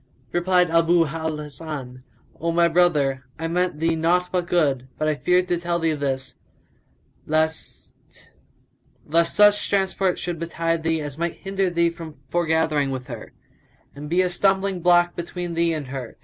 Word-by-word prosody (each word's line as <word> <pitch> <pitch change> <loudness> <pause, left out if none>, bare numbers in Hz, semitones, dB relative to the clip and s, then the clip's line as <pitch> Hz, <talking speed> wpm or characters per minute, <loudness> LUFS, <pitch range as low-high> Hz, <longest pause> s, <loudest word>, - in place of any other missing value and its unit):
Replied 180 -1 +2
Abu 165 0 +4
al 160 +1 -3
Hasan, 145 -4 -7 0.4
"O 170 +1 -1
my 170 0 +4
brother, 150 -6 +2
I 165 +1 -3
meant 175 -1 -1
thee 165 0 +1
naught 175 +3 +1
but 180 -2 -1
good; 140 -8 +1
but 155 - -1
I 155 - +2
feared 180 +4 +1
to 175 - +1
tell 170 0 -1
thee 165 -2 0
this, 135 -2 -3 0.9
lest 160 +1 -1 1.3
such 205 +4 +4
transport 190 -2 +1
should 175 -2 -4
betide 165 0 -1
thee 160 0 0
as 145 0 -6
might 170 0 -1
hinder 195 -1 -1
thee 170 -1 +1
from 165 -2 -10
foregathering 160 -4 +1
with 130 -2 -4
her, - - -9 0.6
and 145 +1 -8
be 175 +3 +3
a 180 - 0
stumbling 195 0 +1
block 175 0 +4
between 175 0 -5
thee 170 0 +1
and 155 -3 -3
her. 130 -3 -7
165 Hz, 160 wpm, -23 LUFS, 155-175 Hz, 1.3 s, Abu